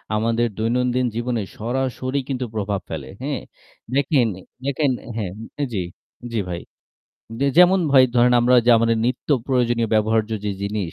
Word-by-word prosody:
আমাদের 115 +2 +1
দৈনন্দিন 125 +3 +1
জীবনে 120 -1 -1 0.2
সরাসরি 130 +3 -2
কিন্তু 130 -2 -2
প্রভাব 100 -2 -2
ফেলে, - - -6
হ্যাঁ? 140 -2 -2 0.5
দেখেন, 140 -3 +3
অ্যা 95 - -12 0.2
দেখেন 140 0 +1
অ্যা - - -14
হ্যাঁ 95 -4 -3 0.4
জি, 95 - 0 0.5
জি 110 - 0
ভাই। 85 -1 -4 0.8
যে 140 - +2
যেমন 180 +2 +7
ভাই 130 -2 +8
ধরেন 125 +1 +5
আমরা 125 +1 +4
যা 120 - +7
আমাদের 115 0 +2
নিত্য 130 - -3 0.2
প্রয়োজনীয় 120 -3 +1
ব্যবহার্য 110 +1 +2
যে 105 - 0
জিনিস, 100 -4 -3
120 Hz, 155 wpm, -22 LUFS, 110-130 Hz, 0.8 s, ভাই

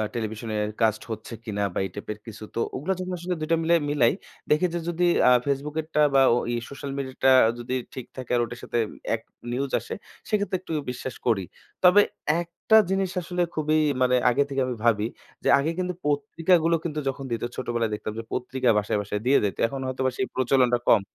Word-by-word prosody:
টেলিভিশনে 110 -1 -3 0.3
কাস্ট 110 -1 +2
হচ্ছে 110 +2 -6
কিনা 105 -3 -2
বা - - -1
এই - - -5
টাইপের 105 +1 -6
কিছু। 110 -1 -9
তো - - -1 0.2
ওগুলো 150 +9 -2
যখন 185 0 -4
আসলে 180 +1 -2
দুইটা 160 +2 +2
মিলাই 170 +1 +4
মিলাই। 135 -5 +3 0.4
দেখি 150 +4 +4
যে 175 - -1
যদি 175 +1 +1 0.2
অ্যা - - +6
ফেসবুকেরটা 150 +3 -1
বা 135 - +7 0.2
ওই 120 - -2 0.2
সোশ্যাল 140 0 -6
মিডিয়াটা 130 -1 +1 0.3
যদি 120 +2 -3 0.2
ঠিক 130 - -6
থাকে 130 -2 -6
আর 120 - +3
ওটার 120 +1 -9
সাথে 120 - -1 0.4
এক 115 - -8 0.3
নিউজ 135 +2 -2
আসে - - -7 0.4
সেক্ষেত্রে 205 -2 0
একটু 175 - -6 0.2
বিশ্বাস 125 0 -5
করি। 110 -5 +2 0.4
তবে 180 +3 +8 0.4
একটা 170 +5 0
জিনিস 190 -1 0
আসলে 180 +1 -3
খুবই 155 0 +1 0.2
মানে 125 0 +4
আগে 125 +3 +3
থেকে 135 -1 -1
আমি 125 -1 -3
ভাবি 110 -2 +3 0.4
যে, - - -1
আগে 150 +4 0
কিন্তু 180 0 -1
পত্রিকাগুলো 165 +4 +2
কিন্তু 155 -3 -3
যখন 135 0 -5
দিত 115 - -2
ছোটবেলায় 120 -3 -1
দেখতাম 105 0 -4
যে - - -5
পত্রিকা 125 0 0
বাসায় 105 0 0
বাসায় 105 +1 -4
দিয়ে 135 +2 +5
যাইতো। 100 - -2
এখন 135 +3 -5
হয়তোবা 130 0 0
সেই 195 - 0
প্রচলনটা 125 -1 +3
কম। 110 - +6
130 Hz, 190 wpm, -25 LUFS, 115-160 Hz, 0.4 s, তবে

